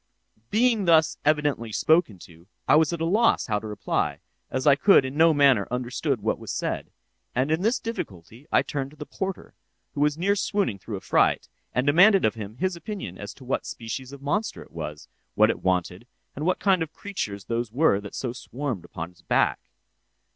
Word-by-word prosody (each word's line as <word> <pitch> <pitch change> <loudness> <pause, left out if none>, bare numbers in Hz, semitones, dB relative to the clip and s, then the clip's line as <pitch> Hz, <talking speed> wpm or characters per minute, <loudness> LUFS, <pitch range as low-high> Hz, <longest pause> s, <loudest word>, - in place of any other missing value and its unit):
"'Being 225 -2 +2
thus 160 -2 +4
evidently 145 -6 +1
spoken 155 - +2
to, 85 +1 -15 0.2
I - - +6
was 160 +2 +4
at 170 -1 -4
a - - +1
loss 220 +7 +3
how 105 -3 0
to 110 - -8
reply, 80 -8 -2 0.3
as 130 0 -2
I 140 -2 +7
could 175 -3 +5
in 130 +1 -5
no 165 +2 +6
manner 140 -8 +4
understand 125 0 -2
what - - -1
was - - -6
said; - - -3 0.5
and 130 +4 +1
in 160 +2 +1
this 225 +5 +2
difficulty 115 - -7
I - - +4
turned 135 -2 -4
to 150 - -18
the 150 - -7
porter, 190 +3 -5 0.4
who 145 - -3
was 150 0 +2
near 200 +4 +2
swooning 195 - -1
through 105 +1 -6
affright, - - +1 0.2
and 125 - 0
demanded 180 +7 +6
of 110 - +2
him 110 0 -8
his 185 +3 -1
opinion 170 - -7
as 100 -1 -6
to 130 - -14
what 130 - -2
species 125 +3 -6
of 140 0 -11
monster 205 +10 -2
it - - -21
was, 75 -2 -7 0.3
what - - +5
it - - -7
wanted, 90 +3 -1 0.3
and 150 +5 -3
what 185 - +2
kind 190 -3 +2
of 160 -1 -3
creatures 105 - -5
those 115 0 -2
were 125 -6 +3
that 100 - -9
so 125 -3 -3
swarmed 130 - -5
upon 85 +1 -7
its 90 - -24
back. - - +1
140 Hz, 200 wpm, -25 LUFS, 105-170 Hz, 0.5 s, I